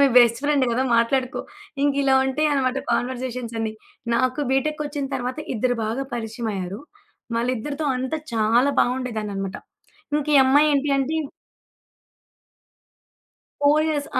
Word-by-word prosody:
మీ 280 - +7
best 235 0 +4
friend 285 -2 +3
గదా! 240 +3 +1
మాట్లాడుకో. 255 +2 +1 0.4
ఇంకిలా 275 -1 +3
ఉంటయనమాట 270 -1 +1
కాన్వర్జేషన్సన్నీ. 240 -3 -2 0.4
నాకు 255 +3 +1
బీటెక్‌కొచ్చిన 290 +1 -1
తర్వాత 255 +2 -3 0.2
ఇద్దరు 245 +2 +1
బాగా 230 +5 -2
పరిచయమయ్యారు. 220 -3 -4 0.6
వాళ్ళిద్దరితో 255 +5 -2
అంతా 260 +5 -2 0.2
చాలా 230 +5 +3
బావుండేదాన్ననమాట. 215 -6 -2 0.6
ఇంక 300 -1 -2
ఈ - - +8
అమ్మాయేంటి 290 +1 +4
అంటే 280 +4 0 2.5
పోయస్ 300 0 +3
255 Hz, 95 wpm, -23 LUFS, 235-285 Hz, 2.5 s, ఈ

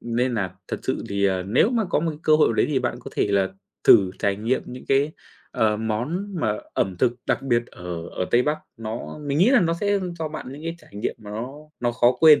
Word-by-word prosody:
nên 120 +1 0
nà 95 -4 -2
thật - - -2
sự - - -1
thì, 100 0 0
ờ, 95 -1 +2
nếu 110 - +3
mà 230 -4 +1
có - - +2
một 165 +1 0
cái 150 - -8
cơ 155 0 +5
hội 155 - +5
nào - - +1
đấy - - +2
thì 145 -3 +2
bạn 125 -2 -2
có - - -9
thể - - +1
là 95 -1 +3 0.4
thử 95 -4 +7
trải 100 -1 +1
nghiệm 115 +5 0
những 125 +1 -8
cái, 140 +3 +3 0.4
ờ, 110 -4 +2
món 120 - -2
mà 105 -7 +1 0.2
ẩm 95 -2 0
thực 120 - +3
đặc - - +1
biệt 120 -3 +1
ở 85 -4 -7
ở 90 - -3
Tây 120 - +5
Bắc, 150 +3 0 0.2
nó 115 +5 -6
mình 140 +1 0
nghĩ 195 +9 +5
là 270 -5 +6
nó 165 -1 +2
sẽ 205 -1 +2 0.2
cho 160 -1 -2
bạn 155 - -7
những 145 +3 -9
cái 165 0 -3
trải - - -20
nghiệm 105 - -2
nó 110 +4 -6 0.3
nó 120 -1 +1
khó 120 +1 +4
quên. 155 -2 +8
120 Hz, 250 wpm, -24 LUFS, 105-155 Hz, 0.4 s, quên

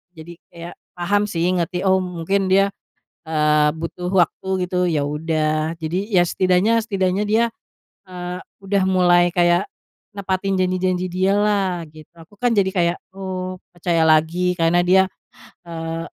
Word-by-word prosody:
jadi 160 +2 -10 0.2
kayak 170 0 -9 0.2
paham 200 +4 +1
sih, 170 -5 -2
ngerti, 180 0 -1
oh 190 -1 +3
mungkin 185 +2 -1
dia, 195 +1 +3 0.6
eee, 150 -1 +2
butuh 165 +2 -5
waktu 185 0 +1 0.2
gitu, 180 - -4
ya 155 -4 0
udah. 155 +1 -1
Jadi, 180 +6 -4
ya, 180 -2 +5
setidaknya 185 +6 +2
setidaknya 195 -3 -1
dia, 220 +2 +3 0.7
eee, 180 0 -6 0.2
udah 195 0 +1
mulai 175 -2 +4
kayak 175 +1 +2 0.5
nepatin 195 -1 -2
janji-janji 185 0 0
dia 185 +2 +1
lah, 200 -4 +1
gitu. 155 0 -16
Aku 185 +6 -19
kan 245 +2 +1
jadi 200 -3 +2
kayak, 175 -2 0 0.2
oh, 185 -1 -5 0.2
percaya 170 -2 +1
lagi, 160 +3 +2
karena 175 0 +2
dia, 190 +1 +4 0.6
eee, 165 0 -5
180 Hz, 140 wpm, -20 LUFS, 165-190 Hz, 0.7 s, ya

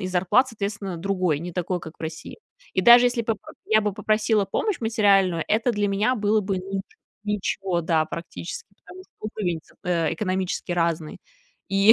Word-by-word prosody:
и 185 - -3
зарплат, 185 +8 +3
соответственно, 200 -4 -4
другой, 180 -4 0
не 175 +3 -6
такой, 180 +1 -1
как 160 -2 -9
в - - -13
России. 160 - -6 0.3
И 185 - +2
даже 240 +4 +8
если 245 -1 0
бы 225 0 0
поп 205 - -14
я 215 0 +4
бы 210 -1 -1
попросила 215 +1 +1
помощь 360 - -1
материальную, 195 -6 +3
это 225 +3 +2
для 210 -3 0
меня 205 +6 +1
было 215 0 +2
бы, 195 -1 -2
ну, 190 +2 -8
нич 195 -1 -1 0.8
ничего, 185 -3 0
да, 160 -1 +2
практически, 170 +1 -7 0.2
потому 370 +1 -11
что - - -35 0.2
уровень, 175 -6 -1 0.2
э, 170 -3 +1
экономически 185 -3 -2
разный. 165 -2 -1 0.5
И 195 +3 +7
195 Hz, 180 wpm, -24 LUFS, 175-215 Hz, 0.8 s, даже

